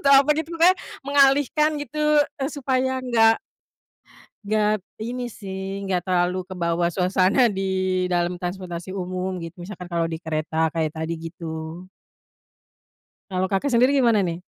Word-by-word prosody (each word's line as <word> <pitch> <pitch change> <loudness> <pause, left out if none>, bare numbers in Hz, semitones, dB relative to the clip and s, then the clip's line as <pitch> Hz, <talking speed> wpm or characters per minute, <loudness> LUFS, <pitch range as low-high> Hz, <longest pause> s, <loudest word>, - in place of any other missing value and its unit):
atau 280 - +6
apa 295 +2 +2
gitu 320 +1 -3
pokoknya 345 +3 +5 0.2
mengalihkan 285 +2 +3
gitu, 300 +1 +2 0.2
eee, 270 0 -2
supaya 260 -2 0
nggak 225 -3 +4 1.0
nggak 210 -1 +1 0.2
ini 240 +2 -4
sih, 195 0 -6
nggak 180 -2 0
terlalu 180 0 +1
kebawa 175 -2 -1
suasana 190 +6 +3
di 195 -3 -1 0.5
dalam 175 0 +1
transportasi 180 0 -5
umum, 185 0 -3
gitu. 170 +1 -8
Misalkan 180 -1 -8
kalau 170 -1 -1
di 160 - -4
kereta 160 0 -1
kayak 160 -2 0
tadi, 160 +1 -2
gitu. 165 +1 -7 1.4
Kalau 185 0 0
Kakak 205 +8 0
sendiri 255 +4 +4
gimana, 235 -6 +4
nih? 170 0 -3
190 Hz, 135 wpm, -23 LUFS, 175-255 Hz, 1.4 s, atau